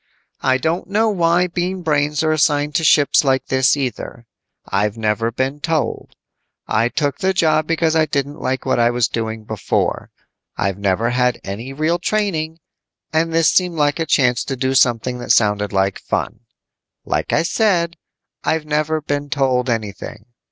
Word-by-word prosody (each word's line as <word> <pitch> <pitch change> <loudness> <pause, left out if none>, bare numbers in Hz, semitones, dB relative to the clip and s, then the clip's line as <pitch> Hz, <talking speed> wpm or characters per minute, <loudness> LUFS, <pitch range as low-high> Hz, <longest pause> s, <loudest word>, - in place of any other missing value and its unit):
"I 130 0 +2
don't 160 +6 -2
know 215 +2 +2
why 175 -2 +2
Bean 180 +1 -3
Brains 150 -1 +1
are 155 - +2
assigned 150 -1 +1
to 160 - 0
ships 150 -2 +4
like 135 -1 +1
this 130 +2 +3
either. 125 -3 -5 0.4
I've 105 +2 -1
never 110 +1 0
been 130 +4 -2
told. 155 0 -2 0.5
I 115 +2 +1
took 145 0 -2
the 190 0 0
job 155 -2 +2
because 165 -1 +1
I 160 -1 +3
didn't 145 0 -2
like 130 +1 -2
what - - +1
I 120 0 +4
was 120 -1 +1
doing 110 -1 -4
before. 110 -1 -2 0.5
I've 100 0 -1
never 100 +4 0
had 125 0 +1
any 110 +7 -6
real 155 +5 0
training, 170 -6 -1 0.6
and 165 +1 +1
this 165 -1 +3
seemed 180 -2 +1
like 145 0 +1
a 165 - -1
chance 125 -3 +2
to 135 - -3
do 130 +1 -1
something 125 -1 +2
that 120 - -8
sounded 105 -2 +2
like 95 -1 0
fun. - - -3 0.7
"Like - - -2
I - - +2
said, 170 -3 +1 0.5
I've 160 -1 0
never 155 +1 0
been 145 0 -3
told 130 -2 +1
anything. 110 -1 -4
145 Hz, 165 wpm, -19 LUFS, 120-160 Hz, 0.7 s, ships